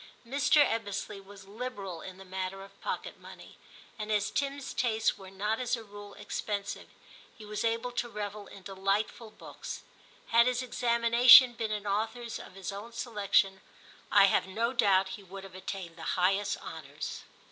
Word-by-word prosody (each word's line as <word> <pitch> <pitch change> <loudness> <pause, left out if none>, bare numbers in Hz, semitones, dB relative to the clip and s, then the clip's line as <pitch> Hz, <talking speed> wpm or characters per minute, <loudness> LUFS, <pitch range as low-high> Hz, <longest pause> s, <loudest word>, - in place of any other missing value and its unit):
Mr. 285 +3 +4
Ebbesley 205 -2 -3
was 195 0 -13
liberal 200 -6 -6
in 185 -1 -9
the 195 - -12
matter 190 +1 -4
of 195 0 -16
pocket - - -4
money, - - -13 0.4
and 215 0 -3
as 205 -1 +1
Tim's 280 -1 -2
tastes 225 -3 +1
were 190 -1 -11
not 210 +4 -1
as 250 0 0
a 230 - -8
rule 205 -1 -11
ex - - -4
pensive, 200 -1 -4 0.5
he 215 - -11
was 210 0 -3
able 230 +2 0
to 240 0 -2
revel 205 -1 -5
in 195 - -13
delightful 195 +4 -1
books. 215 - -9 0.5
Had 235 +1 +6
his 250 0 +1
examinations 240 +1 +7
been 225 -1 -2
in 210 -1 -3
authors 225 +3 -2
of - - -11
his 195 -1 -5
own 205 +4 -8
selection 200 -4 +1 0.5
I 200 -1 +8
have 190 - +2
no 230 +6 -1
doubt 195 -5 +3
he 190 +2 -7
would 195 +1 -9
have 195 -2 -11
attained 185 -2 -6
the - - -10 0.2
highest 195 +3 +2
honours. - - -7
210 Hz, 170 wpm, -30 LUFS, 195-235 Hz, 0.5 s, I